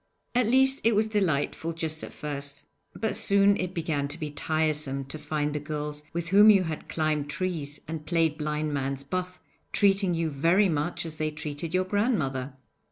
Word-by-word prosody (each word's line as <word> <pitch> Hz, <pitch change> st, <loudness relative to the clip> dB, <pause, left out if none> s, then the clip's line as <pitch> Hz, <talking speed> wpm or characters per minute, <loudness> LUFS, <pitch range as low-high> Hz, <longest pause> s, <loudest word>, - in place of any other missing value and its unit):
At 245 Hz, -2 st, +2 dB
least 265 Hz, +3 st, +4 dB
it 230 Hz, -1 st, +4 dB
was 215 Hz, +1 st, +3 dB
delightful 165 Hz, -6 st, 0 dB
just 160 Hz, -1 st, -3 dB
at -, -, -7 dB
first, 145 Hz, -1 st, -4 dB, 0.3 s
but 220 Hz, 0 st, -1 dB
soon 200 Hz, 0 st, +4 dB
it 185 Hz, 0 st, -3 dB
began 155 Hz, -4 st, -1 dB
to 145 Hz, +3 st, -3 dB
be 155 Hz, -3 st, -4 dB
tiresome 150 Hz, -3 st, -1 dB
to 140 Hz, +3 st, -7 dB
find 150 Hz, 0 st, -2 dB
the 150 Hz, -, -1 dB
girls 150 Hz, 0 st, -4 dB
with 170 Hz, -1 st, -3 dB
whom 205 Hz, +3 st, +8 dB
you 195 Hz, -3 st, +6 dB
had 160 Hz, -3 st, -5 dB
climbed 155 Hz, -2 st, 0 dB
trees 155 Hz, -4 st, -3 dB
and 160 Hz, -1 st, -5 dB
played 165 Hz, -2 st, +1 dB
blind 150 Hz, 0 st, -2 dB
man's 135 Hz, 0 st, -2 dB
buff 180 Hz, +5 st, -4 dB, 0.3 s
treating 195 Hz, -3 st, +3 dB
you 165 Hz, -1 st, -1 dB
very 170 Hz, +8 st, +3 dB
much 155 Hz, +2 st, -1 dB
as 160 Hz, -1 st, -7 dB
they 155 Hz, 0 st, 0 dB
treated 155 Hz, +2 st, -5 dB
your 185 Hz, 0 st, +2 dB
grandmother. 155 Hz, -, 0 dB
155 Hz, 180 wpm, -27 LUFS, 150-185 Hz, 0.3 s, whom